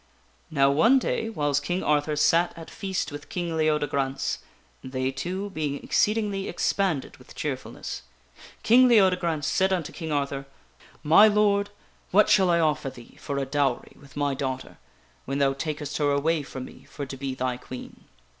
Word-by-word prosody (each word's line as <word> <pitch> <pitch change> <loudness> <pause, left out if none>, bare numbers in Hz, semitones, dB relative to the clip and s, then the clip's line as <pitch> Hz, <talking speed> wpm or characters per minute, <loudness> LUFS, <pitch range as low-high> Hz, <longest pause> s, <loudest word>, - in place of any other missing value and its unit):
Now, 140 -2 +3
one 225 - +5
day, 225 -3 -1
whiles 145 -8 0
King 175 +6 -2
Arthur 150 0 +1
sat 165 +4 +2
at 165 - -10
feast 190 -6 -3
with 145 0 -9
King 175 -2 -3
Leodegrance 145 -3 0 0.4
they 130 0 -2
two 185 +9 -4
being 150 -5 -2
exceedingly 205 -2 +1
expanded 175 -4 -1
with - - -16
cheerfulness - - -5 0.6
King 255 +3 +6
Leode 190 -6 +5
grance 160 -4 -1
said 190 +7 +2
unto 175 -5 -1
King 160 -2 -5
Arthur: 140 -1 -2 0.3
" - - -25
My 210 +5 +9
Lord, 205 -1 +2 0.4
what 210 +3 +4
shall 190 -3 +5
I 170 -1 +3
offer 150 -3 +1
thee 120 -2 -14
for 140 - -3
a 135 - 0
dowery 135 -2 -1
with 140 0 -16
my 145 -1 +1
daughter 130 -1 -4 0.5
when 135 +1 -2
thou 140 -1 +3
takest 150 +1 -4
her 145 -1 +2
away 150 +3 +1
from 130 -2 -7
me - - -14
for 140 - -7
to 135 - -7
be 135 0 -4
thy 130 -1 -2
Queen?" 125 0 -10
150 Hz, 170 wpm, -26 LUFS, 140-185 Hz, 0.6 s, My